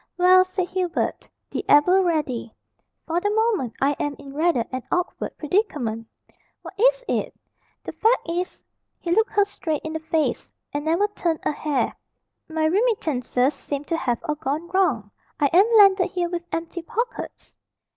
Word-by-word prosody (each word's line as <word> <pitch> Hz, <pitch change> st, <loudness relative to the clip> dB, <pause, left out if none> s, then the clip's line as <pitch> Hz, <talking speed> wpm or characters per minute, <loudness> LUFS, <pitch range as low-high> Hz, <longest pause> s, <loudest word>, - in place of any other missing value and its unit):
"Well," 370 Hz, +1 st, +6 dB
said 370 Hz, -1 st, -3 dB
Hubert, 360 Hz, -2 st, -2 dB, 0.2 s
the -, -, -3 dB
ever 360 Hz, +7 st, +6 dB
ready, 300 Hz, -10 st, -1 dB, 0.5 s
"for 335 Hz, +2 st, -1 dB
the 410 Hz, -, +1 dB
moment 420 Hz, -, +1 dB
I 275 Hz, +1 st, +3 dB
am 290 Hz, -1 st, -2 dB
in 275 Hz, -1 st, -11 dB
rather 305 Hz, -5 st, +1 dB
an 255 Hz, 0 st, -3 dB
awkward 360 Hz, 0 st, -2 dB
predicament." 285 Hz, -, -1 dB, 0.6 s
"What -, -, -9 dB
is -, -, +3 dB
it?" -, -, -1 dB, 0.5 s
"The -, -, -5 dB
fact 455 Hz, +3 st, +1 dB
is" 350 Hz, +2 st, -3 dB, 0.4 s
he 340 Hz, -, -4 dB
looked 445 Hz, +6 st, +3 dB
her 410 Hz, -1 st, +4 dB
straight 320 Hz, -6 st, -4 dB
in 315 Hz, -, -5 dB
the 320 Hz, -, -2 dB
face, 315 Hz, 0 st, -1 dB, 0.2 s
and 290 Hz, +1 st, -3 dB
never 340 Hz, +6 st, +2 dB
turned 340 Hz, -6 st, -2 dB
a -, -, +1 dB
hair 295 Hz, -1 st, -1 dB, 0.5 s
"my 315 Hz, 0 st, 0 dB
remittances 310 Hz, -, +1 dB
seem 285 Hz, -1 st, -5 dB
to 330 Hz, +2 st, -2 dB
have 245 Hz, -6 st, 0 dB
all 310 Hz, -3 st, -1 dB
gone 300 Hz, +2 st, -3 dB
wrong. 300 Hz, -, +1 dB, 0.3 s
I 285 Hz, -2 st, +2 dB
am 395 Hz, +6 st, +5 dB
landed 390 Hz, -3 st, +6 dB
here 355 Hz, -3 st, -2 dB
with 345 Hz, 0 st, -4 dB
empty 330 Hz, +1 st, -4 dB
pockets." 470 Hz, +8 st, -5 dB
335 Hz, 165 wpm, -23 LUFS, 290-375 Hz, 0.6 s, Well